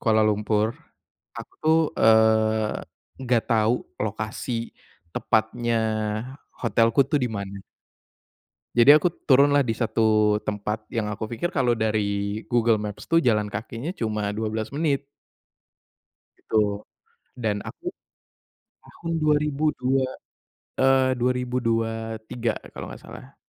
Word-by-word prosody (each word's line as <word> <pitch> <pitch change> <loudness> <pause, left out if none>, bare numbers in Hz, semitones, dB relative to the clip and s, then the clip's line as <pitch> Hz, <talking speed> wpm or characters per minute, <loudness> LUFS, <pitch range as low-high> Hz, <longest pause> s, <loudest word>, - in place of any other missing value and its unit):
Kuala 110 -1 +3
Lumpur, 105 +1 +1 0.6
aku - - -9
tuh, 160 +1 +4 0.2
eee, 110 -1 +3 0.4
gak 120 -3 +3
tau 115 +1 +2 0.2
lokasi 110 +2 -3 0.4
tepatnya 115 +2 0 0.8
hotelku 115 +2 +3
tuh 150 0 +1
di 125 - +1
mana. 100 -2 -5 1.2
Jadi 120 +5 +9
aku 155 +4 +4 0.2
turunlah 140 +1 +5
di 115 - 0
satu 110 -2 +2
tempat 105 +1 -3
yang 110 -2 -1
aku 105 +1 -4
pikir 120 +10 -3
kalo 130 -8 +1
dari 105 -1 -1
Google 115 -2 +2
Maps 105 +5 -7
tuh 165 - +4
jalan 105 -9 +2
kakinya 115 +7 -5
cuma 105 -3 -1
12 110 +1 -3
menit. 145 -2 0 1.4
Gitu, 110 - -2 0.8
dan 110 -4 -1
aku, 345 - -11 1.0
tahun 165 0 -7
dua 150 -1 +4
ribu 150 0 -2 0.2
dua 130 +1 +2 0.8
eee, 130 0 +4
2023 115 -2 -1 0.2
kalau - - -7
gak - - -10
salah. - - -12
115 Hz, 110 wpm, -24 LUFS, 110-125 Hz, 1.4 s, Jadi